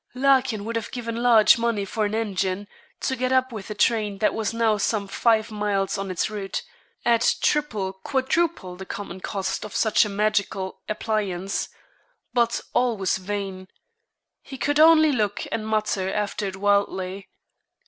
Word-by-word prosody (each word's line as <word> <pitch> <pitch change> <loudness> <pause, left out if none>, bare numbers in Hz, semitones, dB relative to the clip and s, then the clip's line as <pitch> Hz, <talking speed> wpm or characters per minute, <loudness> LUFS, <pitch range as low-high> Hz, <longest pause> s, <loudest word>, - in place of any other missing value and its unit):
Larkin 255 -5 +2
would 230 +1 -4
have 225 - -4
given 230 -2 -5
large 235 -2 +6
money 230 -4 0
for 215 +2 -1
an 205 +1 -2
engine, 200 -2 -1 0.3
to 265 - 0
get 255 0 -1
up 260 0 +2
with 215 -4 -7
the 210 - -5
train 210 -1 +1
that 210 - +2
was 220 -2 -1
now 230 -1 +2
some 205 0 0
five 220 +2 +2
miles 205 -2 -1
on 195 0 -4
its 185 - 0
route, 205 -2 -4 0.4
at 235 -1 +3
treble, 215 -11 0
quadruple, 265 - -1
the 190 +1 -8
common 195 -2 -6
cost 195 -1 -3
of 210 - -8
such 220 -2 +4
a 210 - -3
magical 200 -2 -1
appliance; 200 -3 -2 0.6
but 235 -1 +2
all 245 -2 +2
was 190 -1 0
vain. 190 -1 -5 0.7
He 270 - -9
could 290 +3 0
only 315 -1 +7
look 210 -6 -1
and 220 -1 -2
mutter 210 -3 0
after 205 0 -2
it 190 - -5
wildly. 195 -1 0
210 Hz, 160 wpm, -24 LUFS, 195-235 Hz, 0.7 s, only